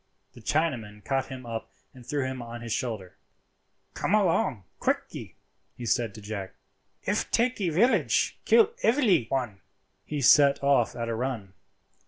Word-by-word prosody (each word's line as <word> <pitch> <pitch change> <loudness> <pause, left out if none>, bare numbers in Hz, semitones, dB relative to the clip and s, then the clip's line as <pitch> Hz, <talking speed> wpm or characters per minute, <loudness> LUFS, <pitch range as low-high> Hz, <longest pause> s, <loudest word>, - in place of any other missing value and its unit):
The 120 - -14
Chinaman 110 -8 -1
caught 135 -1 0
him 130 -2 -8
up 115 -1 -5 0.2
and 130 -2 -13
threw 140 +2 -2
him 130 -1 -4
on 120 0 -8
his 115 -2 -3
shoulder. 110 -8 -4 0.8
"Come 205 - +1
along 165 - +1 0.2
quickee," - - -2 0.4
he 120 - -6
said 115 -2 0
to 110 - -10
Jack; 100 -2 -6 0.5
"if - - -1
takee 235 -6 +1
village, 205 +11 +2
kill 455 -2 +5
evely 210 - +3
one." 120 -8 -2 0.4
He 150 - -4
set 140 +1 +5
off 140 -5 +3
at 115 -1 -3
a 115 - -1
run. 115 -5 -3
125 Hz, 150 wpm, -27 LUFS, 115-150 Hz, 0.8 s, kill